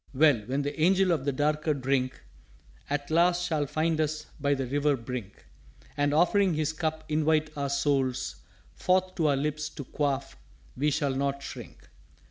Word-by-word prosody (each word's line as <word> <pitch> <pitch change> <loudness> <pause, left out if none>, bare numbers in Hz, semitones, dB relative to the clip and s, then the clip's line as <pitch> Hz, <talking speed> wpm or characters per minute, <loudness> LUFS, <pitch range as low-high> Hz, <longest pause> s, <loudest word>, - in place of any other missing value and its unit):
"_Well, 135 -7 +4
when 135 +3 -1
the 145 +3 -4
Angel 190 +2 +4
of 150 -5 0
the 140 - +2
darker 150 +2 0
drink 130 -1 -1 0.7
At 145 +1 -2
last 175 +2 +3
shall 155 -4 0
find 160 +2 0
us 155 0 -2
by 140 0 +2
the 135 -1 -2
river 145 +2 +1
brink 120 -4 -7 0.5
And 145 0 +1
offering 180 +3 +3
his 155 0 0
Cup 155 0 -2
invite 155 0 +1
our 140 -1 -2
souls 135 -2 0 0.4
Forth 185 0 +1
to 165 -4 +1
our 140 -2 +3
lips 150 +2 -2
to 140 - -8
quaff, 140 0 -2 0.4
we 145 +4 +1
shall 145 -2 0
not 140 0 -1
shrink. - - -9
150 Hz, 165 wpm, -28 LUFS, 140-155 Hz, 0.7 s, Well